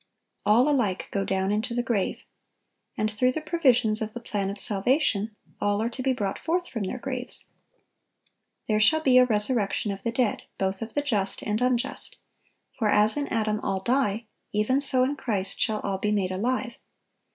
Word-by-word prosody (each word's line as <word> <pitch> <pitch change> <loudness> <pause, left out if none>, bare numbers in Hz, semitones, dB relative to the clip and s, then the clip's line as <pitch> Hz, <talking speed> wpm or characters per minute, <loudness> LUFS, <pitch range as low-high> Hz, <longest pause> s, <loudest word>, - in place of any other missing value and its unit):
All 230 +6 +5
alike 245 -11 0
go 195 - 0
down 190 0 0
into 225 +3 -1
the 245 - 0
grave. 225 -5 -1 0.7
And 215 -1 0
through 250 +4 +2
the - - -2
provisions 255 -9 +2
of 215 0 -3
the - - -4
plan 205 -4 -3
of 200 +1 -6
salvation, 215 0 +2 0.3
all 205 0 +1
are 230 +2 -1
to 255 - -6
be 265 +1 +1
brought 205 -6 -2
forth 350 +2 -1
from 225 -5 -4
their 220 - -4
graves. 255 0 -5 1.2
"There 215 -1 +2
shall 315 +9 +5
be 255 -4 +6
a 250 - +6
resurrection 210 -2 0
of 195 0 -6
the 230 - -1
dead, 250 +1 0 0.2
both 190 0 -1
of 225 0 -6
the 290 - +1
just 205 -9 -1
and 210 +2 -1
unjust;"(955) 250 +2 -3
"for 215 -3 +2
as 210 +1 +4
in 290 -1 -2
Adam 215 -1 0
all 195 -2 -1
die, 235 -1 0 0.3
even 215 +7 +1
so 265 -2 +3
in 275 +3 0
Christ 205 -8 -2
shall 215 -2 0
all 195 -1 -2
be 210 - 0
made 195 -3 0
alive." 240 +5 -2
225 Hz, 185 wpm, -26 LUFS, 205-255 Hz, 1.2 s, be